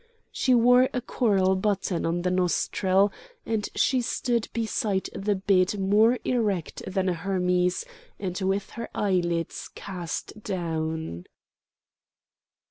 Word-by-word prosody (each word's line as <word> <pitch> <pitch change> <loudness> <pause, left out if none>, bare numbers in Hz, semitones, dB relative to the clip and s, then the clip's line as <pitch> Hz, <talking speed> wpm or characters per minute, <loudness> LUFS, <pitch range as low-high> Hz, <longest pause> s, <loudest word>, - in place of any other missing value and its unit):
She 255 -1 +2
wore 245 +2 +5
a - - +2
coral 195 -6 +2
button 190 -3 0
on 175 +1 -1
the 180 - +1
nostril, 185 +2 +2 0.3
and 220 -2 -1
she 255 -1 +2
stood 235 -1 -1
beside 215 -3 -1
the 205 +1 0
bed 190 0 +2
more 215 +5 +4
erect 210 -9 -1
than 190 0 -1
a 180 - +2
Hermes, 180 0 0 0.3
and 185 -3 -3
with 195 +1 -1
her 230 +1 -6
eyelids 175 -4 -1
cast 185 +2 -6
down. 160 - -3
190 Hz, 120 wpm, -26 LUFS, 180-215 Hz, 0.3 s, wore